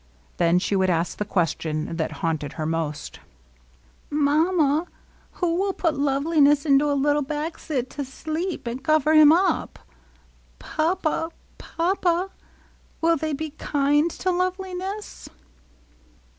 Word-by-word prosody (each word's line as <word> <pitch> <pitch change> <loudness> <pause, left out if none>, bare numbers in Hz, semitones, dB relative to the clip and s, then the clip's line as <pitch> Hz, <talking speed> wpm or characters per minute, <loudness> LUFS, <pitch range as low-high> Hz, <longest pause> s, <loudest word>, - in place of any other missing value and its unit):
Then 170 0 +3
she 200 +2 0
would 190 -1 +2
ask 170 0 -1
the 210 - -1
question 165 -4 -1
that 160 - -1
haunted 155 -3 -2
her 155 - -4
most: 160 -2 -3 0.5
— 60 - -33
^^Mamma^ 305 +2 +2 0.5
who 350 -2 0
will 390 0 0
put 330 -4 0
Loveliness 285 +1 +2
into 285 0 +4
a 285 - +1
little 290 +2 +2
baxet 295 -2 -3
to 290 - -5
sleep^ 315 +6 -4
and 240 +3 -5
cover 310 +1 +3
him 310 -1 +8
up? 350 +1 +1 0.8
Papa, 325 - -1 0.3
Papa, 355 +1 0 0.7
will 330 0 +3
they 315 0 -2
be 310 +2 -4
kind 290 +2 +2
to 370 +2 -2
Loveliness 370 +2 -4
295 Hz, 125 wpm, -24 LUFS, 255-335 Hz, 0.8 s, him